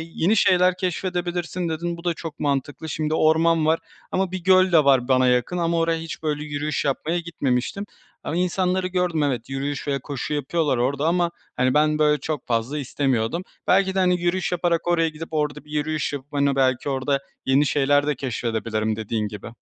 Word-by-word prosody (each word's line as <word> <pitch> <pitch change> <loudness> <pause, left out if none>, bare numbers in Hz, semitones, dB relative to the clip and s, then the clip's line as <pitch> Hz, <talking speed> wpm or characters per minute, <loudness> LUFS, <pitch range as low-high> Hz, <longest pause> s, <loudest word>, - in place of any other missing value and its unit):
yeni 190 +7 +2
şeyler 180 -2 +4
keşfedebilirsin, 180 -1 -2
dedin. 170 +2 -3
Bu 170 - -11
da 175 - +1
çok 165 -1 -8
mantıklı. 145 +2 -2
Şimdi, 155 0 -2
orman 160 0 +3
var 160 +1 +3 0.3
ama 190 -1 0
bir 185 -2 -5
göl 185 -1 +5
de 160 -3 +6
var 130 -3 +4
bana 130 -1 +4
yakın 125 +8 +1
ama 170 0 +1
oraya 165 0 +1
hiç, 160 0 -7
böyle, 150 -1 -1
yürüyüş 150 0 -2
yapmaya 155 +5 0
gitmemiştim 165 +2 -2 0.4
ama 160 - -3
insanları 180 +1 0
gördüm, 180 -4 0
evet, 130 -3 -2
yürüyüş 140 +1 -3
ve 140 -1 0
koşu 140 +2 -5
yapıyorlar 145 -1 0
orada 140 +5 0
ama, 175 0 +2 0.2
hani, 130 0 +2
ben, 150 0 +3
böyle, 150 -1 +3
çok 155 -4 -4
fazla 120 +5 -1
istemiyordum. 135 +2 -1 0.2
Belki 190 0 +3
de, - - +2
hani, 180 -1 +2
yürüyüş 175 +1 0
yaparak 175 -1 0
oraya 165 -2 +2
gidip, 155 +1 -8
orada 150 -1 -2
bir 150 - -15
yürüyüş 155 0 -1
yapıp, 145 +1 -7
hani, 140 -1 +2
belki 130 +1 +1
orada 135 +1 0 0.3
yeni 135 +3 +3
şeyler 145 +1 +2
de 150 - +1
keşfedebilirim, 110 -3 -2
dediğin 110 -1 -2
gibi. 105 +1 -9
155 Hz, 185 wpm, -23 LUFS, 135-175 Hz, 0.4 s, de